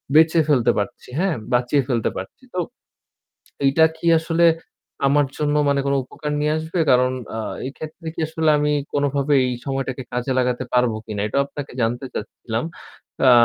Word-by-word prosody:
বেঁচে 160 +1 +6
ফেলতে 135 -6 +4
পারছি, 105 +4 -3
হ্যাঁ? 185 -4 +1 0.2
বাঁচিয়ে 125 +3 +3
ফেলতে 120 -5 +1
পারছি। 95 - -8
তো 180 - -1 1.1
এইটা 140 +4 +5
কি 170 - -6
আসলে 165 +1 +1 0.6
আমার 145 +1 +4
জন্য 150 -1 +1
মানে 140 0 +2
কোন 140 - +2
উপকার 150 +3 -5
নিয়ে 150 +1 +1
আসবে? 160 +3 -4
কারণ 125 0 +4 0.2
আ - - -3 0.3
এই - - -3
ক্ষেত্রে 160 +2 -9
কি - - -5
আসলে 160 0 0
আমি 150 0 +1 0.2
কোনভাবে 145 0 +1
এই 125 - -1
সময়টাকে 135 -1 -2
কাজে 125 +2 -1
লাগাতে 125 0 0
পারব 125 -2 +3
কিনা? 105 -2 -4
এটাও 140 +6 +1
আপনাকে 140 0 -7
জানতে 120 +3 -1
চাচ্ছিলাম। 110 +2 -4 0.6
আ - - +9
140 Hz, 165 wpm, -22 LUFS, 125-155 Hz, 1.1 s, আ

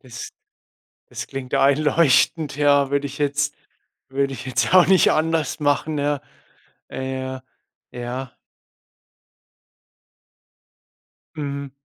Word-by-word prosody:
Das 430 0 -9 0.8
das - - -6
klingt 135 -2 -7
einleuchtend, 145 0 +3
ja, 145 -2 +3
würde 140 0 0
ich 140 0 -10
jetzt 145 0 0 0.5
würde 135 0 -1
ich 125 +1 -8
jetzt 130 - 0
ja 165 - -3
auch 165 - +1
nicht 190 -4 +5
anders 160 -2 0
machen, 150 +1 0
ja? 145 0 0 0.7
Äh, 130 0 -4
ja. 130 0 -6 0.5
Ja. 125 +1 -6 3.0
Mhm. 140 -2 -4
140 Hz, 105 wpm, -22 LUFS, 130-150 Hz, 3.0 s, nicht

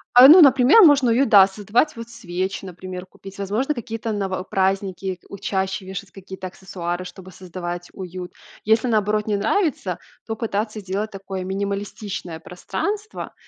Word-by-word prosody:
А, 250 +2 +11
ну, 340 +6 +10
например, 275 - +7
можно 280 -7 +6
уют, 260 +4 +2
да, 195 -4 +8
создавать, 210 +9 0
вот 230 0 -8
свечи, 190 -4 -4
например, 185 0 -8
купить, 195 +1 -13
возможно, 215 +9 -1
какие-то 225 -2 -5
ново 195 -3 -2
праздники 190 -1 -1
у 200 - -8
чаще 190 -1 -2
вешать 195 0 -7
какие-то 190 -1 -8
аксессуары, 180 -1 -5
чтобы 185 +1 -11
создавать 175 -1 -7
уют. 180 -1 -7 0.3
Если, 220 +3 +3
наоборот, 210 -1 +1
не 210 - +1
нравится, 225 - 0 0.3
то 225 - -4
пытаться 215 0 -3
сделать 205 +2 -3
такое 195 -1 -6
минималистичное 195 -2 -4
пространство, 405 - -5
195 Hz, 145 wpm, -22 LUFS, 185-225 Hz, 0.3 s, А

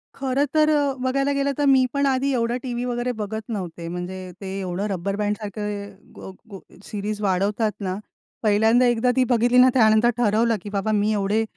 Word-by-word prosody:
खरं 270 +1 0
तर 305 0 +4 0.3
बघायला 275 +2 0
गेलं 280 0 0
तर 290 - +1
मी 265 -2 +5
पण 280 0 +1
आधी 270 0 +1
एवढं 235 0 0
टीव्ही 245 -1 -3
वगैरे 245 0 -2
बघत 220 -1 -4
नव्हते. 175 -5 -5
म्हणजे 180 +1 -6
ते 195 0 -5
एवढं 185 +2 -3
रब्बर 195 0 -3
बँडसारखं 205 -1 -5
गो 190 - -9 0.2
गो 195 - -8 0.2
सीरीज 210 +1 -5
वाढवतात 205 +3 0
ना. 185 -2 -3 0.5
पहिल्यांदा 220 +4 +4
एकदा 240 +1 +2
ती 260 - +4
बघितली 245 0 +3
ना 255 +1 +7
त्यानंतर 220 -1 +4
ठरवलं, 230 0 +2
की 205 - -8
बाबा 200 +1 -1
मी 210 0 +1
एवढे 205 +2 +1
220 Hz, 175 wpm, -23 LUFS, 200-250 Hz, 0.5 s, ना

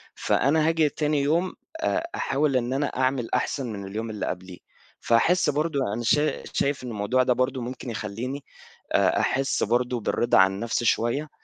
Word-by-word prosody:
فأنا 155 +4 +2
هاجي 160 -2 +2
تاني 150 0 0
يوم 170 +6 +1 0.3
آآ 325 +1 0
أحاول 140 -1 +1
إن 125 +1 -1
أنا 140 +1 0
أعمل 130 -2 -1
أحسن 135 -4 -1
من 100 -1 -6
اليوم 110 +3 -4
اللي 105 -1 -4
قبليه، 90 0 -6 0.4
فأحس 150 +9 +3
برضه 150 0 0
أنا 120 +2 -3
شا 150 +6 +1
شايف 140 -2 0
إن 125 - -5
الموضوع 115 +4 +1
ده 125 -1 +3
برضه 130 +1 -1
ممكن 125 +1 -6
يخليني 115 +6 -5 0.5
آآ - - +3
أحس 135 +1 0
برضه 120 +2 0
بالرضا 120 +3 +2
عن 95 0 +6
النفْسي 115 +2 -2
شوية، 130 +8 +1
130 Hz, 170 wpm, -25 LUFS, 115-145 Hz, 0.5 s, عن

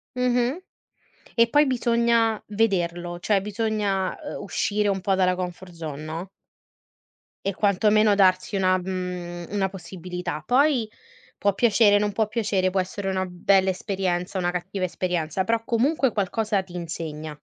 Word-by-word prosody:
Mh-mh. 250 +5 +1 0.7
E 230 0 +4
poi 295 +3 +5
bisogna 235 -3 +2
vederlo, 175 -5 -1
cioè 195 +2 +2
bisogna, 205 -2 -1 0.2
uhm, - - -7
uscire 210 0 0
un 195 -1 +1
po' 195 +1 +1
dalla 185 -1 +2
comfort 180 0 -6
zone, 155 -3 -6
no? 165 +4 -6 1.2
E 195 -1 -1
quantomeno 210 +1 +3
darsi 190 0 +3
una 185 -1 +3
mhmm, 180 -2 -5
una 195 -1 0
possibilità. 180 -4 -6
Poi 260 -3 +3 0.5
può 200 -1 +1
piacere, 215 -3 +5
non 205 0 0
può 215 +1 0
piacere, 205 -4 0
può 190 +1 0
essere 195 +1 -3
una 190 0 0
bella 190 +1 +2
esperienza, 185 -1 -2
una 175 -1 0
cattiva 185 +1 -3
esperienza, 175 -1 -1
però 230 +3 0
comunque 265 +2 +2
qualcosa 210 0 0
ti 180 -2 -13
insegna. 160 -3 -5
195 Hz, 140 wpm, -24 LUFS, 180-215 Hz, 1.2 s, poi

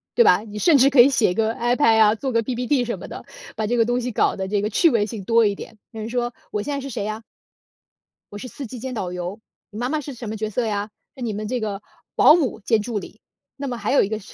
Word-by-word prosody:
对 475 - +6
吧？” 430 - +6
你 210 0 -8
甚 300 +7 +5
至 270 +1 +5
可 270 -3 +7
以 255 - +6
写 230 -9 +2
个 220 +3 0
iPad 240 0 +2
啊， 215 0 +5
做 265 +4 -3
个 230 -1 +2
PPT 250 +2 0
什 235 - -3
么 - - -10
的， - - -9 0.3
把 215 -1 -1
这 240 - 0
个 230 - +4
东 245 +2 0
西 250 0 -3
搞 - - +1
得 190 -1 -3
这 205 +1 0
个 210 - -1
趣 335 - +4
味 230 -7 +2
性 215 -3 -7
多 230 +1 +4
一 205 - +2
点。 220 +2 -10
有 225 - -9
人 215 +1 -5
说 240 0 -2 0.2
我 210 - -2
现 290 +7 -4
在 280 - -2
是 275 0 -6
谁 205 -5 -4
啊？ 215 +1 -4 1.1
“我 205 - -6
是 230 - -7
司 275 +2 -8
机 250 - -8
兼 260 +2 -5
导 190 -6 -3
游， 180 +3 -5 0.3
你 210 - -8
妈 245 +1 -1
妈 310 - 0
是 285 0 -7
什 235 -3 -7
么 220 - -4
角 215 0 -3
色 245 - -1
呀？ 210 -1 -2 0.2
是 260 - -7
你 225 -3 -2
们 210 +1 -4
这 250 +2 -2
个 210 -3 -4 0.3
保 305 - +7
姆 280 -10 -1
兼 220 +1 +1
助 220 -1 -3
理。 205 +3 -12 0.4
那 280 0 -4
么 250 - -3
还 - - -2
有 280 - +5
一 - - -1
个 215 +1 -3
是 195 - -14
230 Hz, 330 characters per minute, -22 LUFS, 210-250 Hz, 1.1 s, 可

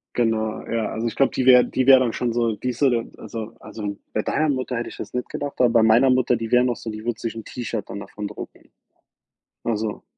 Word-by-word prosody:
genau, 110 -2 0
ja. 115 -1 -1
Also, 115 +1 -2
ich 115 - -4
glaube, 135 - +3
die 130 - -1
wäre 125 -1 +8
die 130 0 -1
wäre 135 -1 +9
dann 120 -3 0
schon 120 -2 -1
so 115 -2 +1
die 125 - -3
ist 120 - -4
so 140 - +5
der 115 -2 0
also 115 0 -7
also, 105 -2 -6 0.2
bei 110 - +1
deiner 155 +7 0
Mutter 130 -3 -1
hätte 120 - -3
ich - - -11
das 105 - -7
nicht 125 -1 -2
gedacht, 145 -1 -4
aber 125 - +5
bei 115 -1 +4
meiner 115 +4 +5
Mutter, 125 -1 +3
die 115 -1 -5
wäre 125 0 +5
noch 125 -1 +1
so 110 - -6
die 110 0 -8
würde 120 -1 -3
sich 115 -2 -3
'n 115 - -6
T-Shirt 115 -3 -5
dann 100 - -5
davon 105 +1 -6
drucken. 105 - -10 1.0
Also, 110 -2 -2
115 Hz, 255 wpm, -23 LUFS, 110-125 Hz, 1.0 s, wäre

